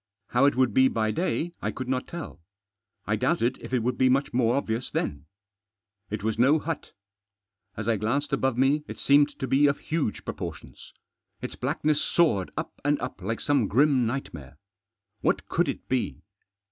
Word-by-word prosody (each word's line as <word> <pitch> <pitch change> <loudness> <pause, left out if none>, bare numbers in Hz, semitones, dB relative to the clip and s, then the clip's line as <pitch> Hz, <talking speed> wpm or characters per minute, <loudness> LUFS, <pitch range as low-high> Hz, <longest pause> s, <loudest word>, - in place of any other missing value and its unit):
How 125 +3 +3
it 140 - +3
would 130 -4 +2
be 130 +3 +6
by 110 -3 0
day 175 - -1
I - - -1
could 130 - -5
not 130 0 -1
tell. 170 - -8 0.6
I - - +1
doubted 120 +2 +1
if - - -9
it 125 -3 +1
would 125 +1 -1
be 130 - +5
much 135 +2 +1
more 120 -1 +2
obvious 120 -3 -2
then 70 +2 -3 0.8
It 105 -1 -4
was 110 0 -1
no 135 +6 +5
hut 165 +2 -5 0.8
As 110 0 -4
I 115 -2 +2
glanced 135 +8 -1
above 135 -2 +1
me 140 +3 +3
it - - -7
seemed 145 +1 +4
to - - -3
be 140 +3 +4
of 140 - +1
huge 155 -9 -2
proportions. - - -7 0.5
Its - - -5
blackness 150 0 0
soared 125 - +2
up - - -5
and 145 0 +2
up - - -6
like 115 +5 -2
some 140 -7 +2
grim 130 +1 +3
nightmare. 75 - -5 0.6
What - - 0
could - - +1
it - - -5
be 130 -2 -2
130 Hz, 180 wpm, -27 LUFS, 115-145 Hz, 0.8 s, be